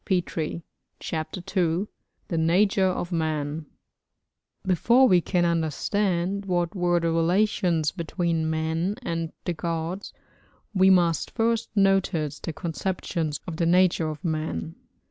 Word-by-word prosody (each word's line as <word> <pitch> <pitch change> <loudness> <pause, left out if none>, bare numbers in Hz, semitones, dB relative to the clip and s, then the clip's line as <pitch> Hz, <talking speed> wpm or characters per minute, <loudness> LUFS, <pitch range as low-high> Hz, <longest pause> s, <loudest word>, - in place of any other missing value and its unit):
CHAPTER 160 +2 -4
II 180 +2 +1 0.4
THE 165 - -1
NATURE 190 +4 +3
OF 180 -1 -2
MAN 155 -2 -2 1.0
Before 235 +8 +4
we 180 -5 +5
can 175 0 +1
understand 175 +4 0
what 175 -2 0
were 175 -2 +2
the 165 0 0
relations 170 -2 +2
between 170 -2 -1
man 160 +4 -1
and 165 -6 -3
the 175 - 0
gods 170 +3 -4 0.6
we 190 -1 +5
must 175 -3 +3
first 230 0 0
notice 190 -7 +2
the - - -4
conceptions 165 -2 -3
of 165 -3 -6
the 170 - +1
nature 175 -2 +3
of 155 +2 -7
man. 155 - -2
170 Hz, 120 wpm, -25 LUFS, 160-190 Hz, 1.0 s, we